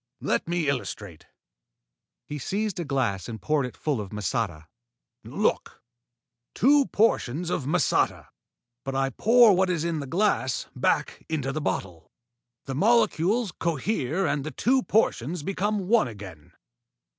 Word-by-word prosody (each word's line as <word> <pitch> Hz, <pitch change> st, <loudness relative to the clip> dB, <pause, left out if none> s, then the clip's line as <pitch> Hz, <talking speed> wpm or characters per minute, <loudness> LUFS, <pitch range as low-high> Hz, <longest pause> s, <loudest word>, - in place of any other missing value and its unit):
Let -, -, -1 dB
me 170 Hz, -2 st, -1 dB
illustrate." 105 Hz, -, -4 dB, 1.0 s
He 150 Hz, -, -6 dB
seized 200 Hz, +6 st, -2 dB
a -, -, -1 dB
glass 120 Hz, -, -1 dB
and 110 Hz, -1 st, -6 dB
poured 150 Hz, -1 st, 0 dB
it 125 Hz, -, -12 dB
full 145 Hz, -8 st, -1 dB
of 100 Hz, -, -7 dB
masata. 105 Hz, -6 st, -2 dB, 0.6 s
"Look! -, -, -2 dB, 0.7 s
Two 280 Hz, +2 st, +4 dB
portions 175 Hz, -, +1 dB
of 140 Hz, -, -2 dB
masata. 170 Hz, +2 st, +1 dB, 0.5 s
But 135 Hz, 0 st, -4 dB
I 135 Hz, 0 st, 0 dB
pour 230 Hz, -, +5 dB
what 190 Hz, +1 st, +2 dB
is 170 Hz, -3 st, 0 dB
in 170 Hz, -2 st, -1 dB
the 140 Hz, -, -5 dB
glass 175 Hz, -, 0 dB
back -, -, 0 dB
into 140 Hz, -4 st, -1 dB
the 155 Hz, +3 st, -3 dB
bottle. 90 Hz, -, -4 dB, 0.6 s
The 135 Hz, -, -4 dB
molecules 210 Hz, -, +2 dB
cohere 165 Hz, -, -1 dB
and 145 Hz, -2 st, 0 dB
the 155 Hz, -, -4 dB
two 255 Hz, -, +1 dB
portions 170 Hz, -, 0 dB
become 195 Hz, +2 st, -1 dB
one 225 Hz, -, +4 dB
again. 100 Hz, -9 st, -11 dB
155 Hz, 140 wpm, -26 LUFS, 125-195 Hz, 1.0 s, pour